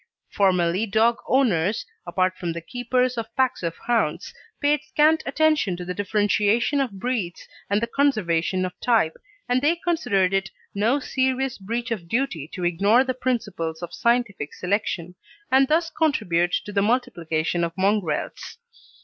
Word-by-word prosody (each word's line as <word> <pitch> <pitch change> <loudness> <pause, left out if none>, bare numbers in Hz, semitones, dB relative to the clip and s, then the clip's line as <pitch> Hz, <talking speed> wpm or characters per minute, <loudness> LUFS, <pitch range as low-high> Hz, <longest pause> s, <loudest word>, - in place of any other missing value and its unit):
Formerly 185 +1 +2
dog 225 +3 +3
owners 215 -7 +2 0.2
apart 185 +2 +1
from 175 -2 -4
the 170 - -6
keepers 250 +4 -1
of 225 0 -7
packs 260 -1 +1
of 165 -1 -3
hounds 205 -8 0 0.3
paid 290 0 +2
scant 305 +1 +3
attention 300 - +2
to 180 - -6
the 180 - -3
differentiation 210 +6 +1
of 235 -8 -3
breeds 220 -7 -3 0.2
and 200 +1 +2
the - - +4
conservation 185 - +1
of 180 - -5
type, 225 -10 +2 0.3
and 250 +1 +2
they 305 +4 +3
considered 245 - 0
it 195 0 0 0.2
no 225 +8 +2
serious 260 -2 -1
breach 230 +5 -4
of 190 -7 -3
duty 205 - -1
to 180 - -6
ignore 200 +8 +4
the 260 -1 -2
principles 205 -11 -3
of 175 - -6
scientific 235 -10 0
selection, 180 -2 -2 0.4
and 265 +1 +5
thus 330 +3 +1
contribute 180 - +1
to 210 - -6
the 200 -1 +1
multiplication 170 -8 0
of 170 - -1
mongrels. 195 - -1
215 Hz, 150 wpm, -24 LUFS, 180-255 Hz, 0.4 s, and